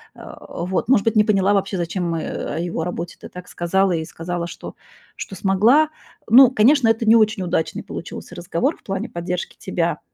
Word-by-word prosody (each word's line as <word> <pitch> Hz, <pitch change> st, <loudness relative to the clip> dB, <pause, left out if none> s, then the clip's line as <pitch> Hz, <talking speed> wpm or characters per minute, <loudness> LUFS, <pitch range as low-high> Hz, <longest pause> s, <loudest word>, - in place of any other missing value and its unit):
Э, -, -, -11 dB
вот. 185 Hz, +6 st, -3 dB
Может 220 Hz, -6 st, +4 dB
быть, 225 Hz, -, +1 dB
не 210 Hz, -, +6 dB
поняла 200 Hz, -1 st, +2 dB
вообще, 195 Hz, -1 st, 0 dB
зачем 175 Hz, +1 st, -2 dB
мы 165 Hz, -1 st, -2 dB
о -, -, -4 dB
его 170 Hz, -1 st, -3 dB
работе 175 Hz, 0 st, -5 dB
ты -, -, -10 dB
так 180 Hz, 0 st, -11 dB
сказала 190 Hz, +2 st, +1 dB
и 160 Hz, -1 st, -2 dB
сказала, 170 Hz, +1 st, -5 dB
что -, -, -9 dB, 0.4 s
что 195 Hz, -, -7 dB
смогла. 220 Hz, -, +3 dB, 0.4 s
Ну, 255 Hz, +2 st, +8 dB
конечно, 255 Hz, +2 st, +4 dB
это 225 Hz, 0 st, +1 dB
не 225 Hz, +1 st, +6 dB
очень 215 Hz, -3 st, +2 dB
удачный 165 Hz, -2 st, -2 dB
получился -, -, -8 dB
разговор 175 Hz, -, -2 dB
в -, -, -29 dB
плане 195 Hz, 0 st, -4 dB
поддержки 175 Hz, +1 st, -4 dB
тебя. 170 Hz, -2 st, -2 dB
190 Hz, 190 wpm, -21 LUFS, 170-215 Hz, 0.4 s, Ну